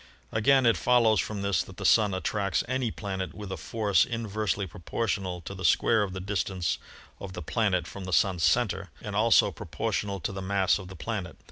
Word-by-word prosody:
Again 130 Hz, +4 st, +4 dB
it 115 Hz, -5 st, +4 dB
follows 115 Hz, +1 st, +4 dB
from 105 Hz, -2 st, -3 dB
this 100 Hz, -3 st, +2 dB
that 95 Hz, -, -10 dB
the 100 Hz, -, -5 dB
Sun 105 Hz, -1 st, +4 dB
attracts 100 Hz, +1 st, 0 dB
any 130 Hz, -1 st, 0 dB
planet 95 Hz, -6 st, -5 dB
with 100 Hz, -1 st, -7 dB
a -, -, -2 dB
force 100 Hz, +1 st, +1 dB
inversely 105 Hz, -3 st, -2 dB
proportional 95 Hz, +1 st, -3 dB
to 95 Hz, -, -7 dB
the 95 Hz, -1 st, -8 dB
square 110 Hz, +2 st, +4 dB
of 100 Hz, -3 st, -2 dB
the 95 Hz, -, -4 dB
distance 95 Hz, -4 st, -1 dB, 0.4 s
of 95 Hz, -2 st, -7 dB
the 90 Hz, -, -6 dB
planet 95 Hz, 0 st, +1 dB
from 100 Hz, -2 st, -8 dB
the 95 Hz, -, -5 dB
Sun's 95 Hz, -3 st, +2 dB
center 95 Hz, -2 st, +1 dB
and 105 Hz, -1 st, -6 dB
also 110 Hz, +2 st, +4 dB
proportional 100 Hz, -1 st, -3 dB
to -, -, -2 dB
the 95 Hz, 0 st, -5 dB
mass 95 Hz, 0 st, +2 dB
of 95 Hz, -, -9 dB
the 95 Hz, -, -10 dB
planet. 95 Hz, -4 st, -5 dB
100 Hz, 200 wpm, -28 LUFS, 95-110 Hz, 0.4 s, Again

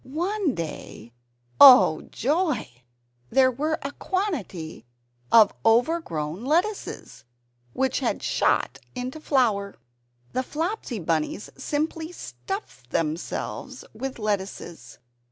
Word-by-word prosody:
One 345 Hz, -, -1 dB
day 135 Hz, -8 st, -7 dB, 0.5 s
oh 250 Hz, -, +9 dB
joy! 305 Hz, -, 0 dB, 0.6 s
there 260 Hz, -, +4 dB
were 305 Hz, +5 st, -1 dB
a 280 Hz, -, -3 dB
quantity 275 Hz, -, -3 dB, 0.5 s
of 220 Hz, -3 st, +7 dB
overgrown 225 Hz, -, +1 dB
lettuces, 350 Hz, +10 st, -1 dB, 0.5 s
which 265 Hz, 0 st, 0 dB
had -, -, -1 dB
"shot" -, -, +1 dB, 0.2 s
into 255 Hz, +4 st, -5 dB
flower. 220 Hz, -10 st, +1 dB, 0.6 s
The 255 Hz, -, +1 dB
Flopsy 315 Hz, -, -3 dB
Bunnies 165 Hz, +2 st, -2 dB
simply 315 Hz, +4 st, -3 dB
stuffed 355 Hz, -, -7 dB
themselves 160 Hz, +3 st, -3 dB
with 260 Hz, +4 st, -5 dB
lettuces. 195 Hz, -, -4 dB
255 Hz, 95 wpm, -25 LUFS, 190-315 Hz, 0.6 s, oh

